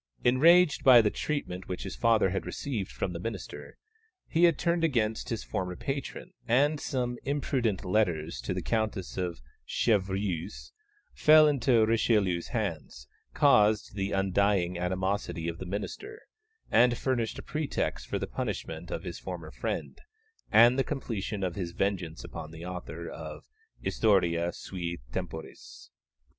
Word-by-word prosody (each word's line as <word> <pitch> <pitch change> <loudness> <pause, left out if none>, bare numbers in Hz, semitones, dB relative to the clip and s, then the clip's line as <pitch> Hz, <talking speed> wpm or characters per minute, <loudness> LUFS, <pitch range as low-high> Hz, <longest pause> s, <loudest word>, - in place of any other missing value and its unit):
Enraged 160 +6 +5
by 130 -2 +9
the 105 -2 +3
treatment 95 -12 -3
which 90 - -4
his - - -6
father 110 -5 +3
had 95 - -2
received 115 -9 -4
from 90 - -3
the 85 - -5
minister, 115 +6 -7 0.5
he 170 +1 +4
had 170 -4 +4
turned 170 0 0
against 115 -8 0
his 115 -3 -3
former 90 -4 -3
patron, 140 - -5
and 145 +6 +3
some 125 -4 -2
imprudent 130 -8 -1
letters 85 - 0
to - - -4
the - - -2
Countess 110 -4 -2
of 90 -8 -3 0.2
Chevreuse, 95 - -1 0.4
which - - -19
fell 155 0 +8
into 125 -5 +3
Richelieu's 105 -6 +2
hands, 65 -1 -4 0.3
caused 110 -9 +4
the 100 -1 -2
undying 95 -1 +1
animosity 95 -1 -2
of 85 0 -4
the 95 - -6
minister, 410 - -6 0.5
and 120 0 +5
furnished 120 -4 -1
a - - -7
pretext 155 -1 -2
for - - -2
the - - -2
punishment - - -5
of - - -4
his - - -6
former - - -7
friend, - - -4 0.5
and 120 +4 +6
the - - +4
completion 110 -8 -4
of 90 -2 -1
his 85 -3 -4
vengeance 90 -4 -2
upon 75 - -7
the 80 +2 -9
author 90 -2 -6
of 80 -2 -8 0.4
Historia 85 -5 +2
sui 85 -1 -5
temporis. 80 0 -7
105 Hz, 145 wpm, -29 LUFS, 90-125 Hz, 0.5 s, by